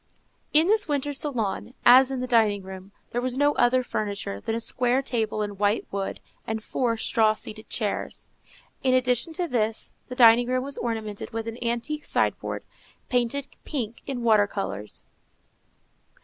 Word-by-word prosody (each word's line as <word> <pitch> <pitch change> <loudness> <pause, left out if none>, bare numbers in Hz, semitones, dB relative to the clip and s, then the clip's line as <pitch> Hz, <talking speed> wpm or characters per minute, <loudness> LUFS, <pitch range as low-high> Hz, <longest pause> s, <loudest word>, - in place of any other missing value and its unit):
In 310 +2 +6
this 420 +1 +3
winter 290 -1 -1
salon, 245 -5 -2
as 255 +2 +8
in 265 -2 -3
the - - -1
dining 220 -5 +3
room, 190 +1 -10 0.2
there 240 - -1
was 255 0 -2
no 290 +1 +3
other 255 +1 +3
furniture 200 - -3
than 225 - -2
a - - -1
square 250 +3 +1
table 220 -4 -1
in 205 -2 -6
white 205 +2 +1
wood, 195 -1 -3 0.3
and 220 -1 -3
four 235 -2 -1
straw 220 -1 +2
seated 215 +1 -7
chairs. 210 -3 -3 0.5
In 255 -1 +3
addition 250 +4 +1
to 350 +1 -2
this 225 -5 -1 0.2
the 250 - -7
dining 240 -1 +7
room 255 0 0
was 280 +1 -2
ornamented 220 -3 -4
with 225 0 -3
an 230 +2 -5
antique 240 +6 -2
sideboard, - - -1 0.5
painted 250 +3 0 0.2
pink, 235 -6 -4
in 255 -4 -3
water 215 -3 +5
colors. 150 - -3
235 Hz, 165 wpm, -26 LUFS, 215-255 Hz, 0.5 s, as